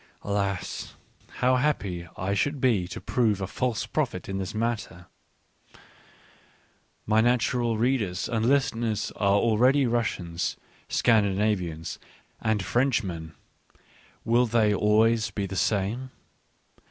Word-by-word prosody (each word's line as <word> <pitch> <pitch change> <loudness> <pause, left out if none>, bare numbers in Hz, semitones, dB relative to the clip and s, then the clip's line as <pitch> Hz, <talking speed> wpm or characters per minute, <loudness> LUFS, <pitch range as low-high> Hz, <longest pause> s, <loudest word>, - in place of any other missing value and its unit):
Alas! 100 -2 -3 0.5
how 130 0 +4
happy 100 -11 -1
I 95 +2 -1
should 145 +8 0
be 115 -9 +2
to - - -7
prove 110 -5 +1
a 95 - -2
false 120 +3 -2
prophet 130 -12 -2
in 95 0 -3
this 95 +2 -5
matter! 110 -6 -3 2.0
My 110 +1 +3
natural 120 -1 +1
readers 110 -6 0
and 115 -2 -1
listeners 120 -5 +1
are 100 -1 +3
already 125 +6 +3
Rus 120 -2 +1
sians, 85 -1 -3 0.3
Scandinavians, 100 -7 +1 0.4
and 110 -3 0
Frenchmen 100 -11 0 0.4
— - - -30
will 120 +2 +3
they 110 -2 +3
always 110 +2 +3
be 100 - -3
the 95 0 -6
same 105 +6 0
110 Hz, 115 wpm, -26 LUFS, 95-120 Hz, 2.0 s, how